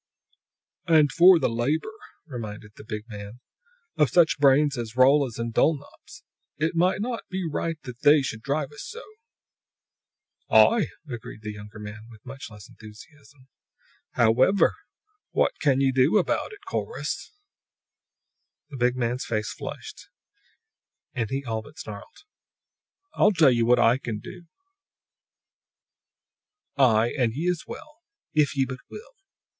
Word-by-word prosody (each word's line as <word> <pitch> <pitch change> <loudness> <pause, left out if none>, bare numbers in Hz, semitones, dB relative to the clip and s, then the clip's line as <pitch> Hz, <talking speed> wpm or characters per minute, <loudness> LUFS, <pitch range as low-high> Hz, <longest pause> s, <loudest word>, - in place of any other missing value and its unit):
"And 155 -4 +5
for 180 +4 +7
the - - +1
labor," 140 - -1 0.3
reminded 110 -6 -8
the - - -12
big 105 -1 -6
man, 105 +1 -9 0.6
"of 150 -4 +3
such 165 +2 +3
brains 140 +1 +4
as 115 -2 -6
Rolla's 130 -1 +4
and 115 0 -4
Dulnop's. 145 +1 -2 0.3
It 155 +3 0
be 165 - -1 0.2
not 230 +3 -3 0.3
right 165 +2 -2
that 125 -3 -9
They 145 -1 +5
should 110 -4 -5
drive 140 +3 -2
us 145 - -10
so!" 470 +3 -9 1.5
"Aye," 230 -3 +5 0.2
agreed 115 -4 -8
the 105 - -4
younger 105 +1 -11
man, 105 +1 -9
with 110 -3 -16
much 135 0 -9
less 105 -3 -13
enthusiasm. 135 +5 -16 0.7
"However, 125 - +3 0.6
what - - +1
can 135 -3 +2
ye 135 -1 +3
do 130 +9 +3
about 195 - 0
it, 405 -1 -14
Corrus?" 460 - -4 1.4
The 140 - -7
big 125 0 +1
man's 120 +1 -2
face 105 -2 -2
flushed, - - -9 1.1
and 115 -3 -2
he 135 +2 -3
all 110 -2 -3
but 110 - -16
snarled. 105 - -10 0.9
"I 210 - +4
tell 150 -4 +6
ye 120 -1 +1
what 120 +2 +4
I 120 +3 +4
can 115 -5 -4
do 170 +10 -11 2.3
I, 120 -4 +3
and 120 -4 0
ye 165 +5 -2
as 175 - -6
well, 305 0 -10 0.4
if 145 -2 +1
ye 135 - +3
but 130 -1 -7
will! 485 +4 -11
130 Hz, 140 wpm, -25 LUFS, 115-150 Hz, 2.3 s, for